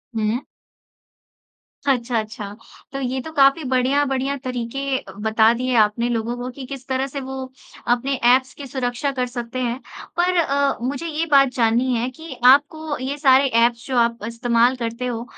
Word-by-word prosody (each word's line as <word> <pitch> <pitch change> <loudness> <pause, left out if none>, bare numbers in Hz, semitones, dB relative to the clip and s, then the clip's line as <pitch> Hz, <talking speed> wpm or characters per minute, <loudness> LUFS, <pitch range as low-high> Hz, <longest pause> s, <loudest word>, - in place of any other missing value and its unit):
हुँ। 220 +3 0 1.5
अच्छा, 245 -3 +1
अच्छा। 210 -2 -7 0.4
तो 275 - -3
ये 260 0 -2
तो 320 - -8
काफ़ी 275 +2 +4
बढ़िया-बढ़िया 270 +1 +1
तरीके 260 +1 -3
अ, - - -13
बता 220 +2 +3
दिए 250 +1 -1
आपने 235 +3 -1
लोगों 235 +1 -1
को 245 +1 -5
कि 260 +1 -9
किस 265 -1 -9
तरह 265 +1 -1
से 275 +1 -6
वो 265 0 -5 0.4
अपने 245 +3 +1 0.2
ऐप्स 260 0 +1
की 280 -2 -9
सुरक्षा 255 +1 -2
कर 255 -2 -2
सकते 245 0 -5
हैं। 245 +1 -2 0.4
पर 360 +1 +2
अ, 280 -3 +1
मुझे 280 +6 -3
ये 320 +1 -2
बात 275 -2 +6
जाननी 240 +2 +2
है 240 +2 -1
कि 320 +2 -10
आपको 290 +3 +4
ये 265 +3 -4
सारे 270 -1 +5
ऐप्स 235 0 +2
जो 260 -2 -1
आप 235 0 +2
इस्तेमाल 235 +1 +2
करते 235 0 -4
हो 235 -1 -3
255 Hz, 170 wpm, -21 LUFS, 235-275 Hz, 1.5 s, बात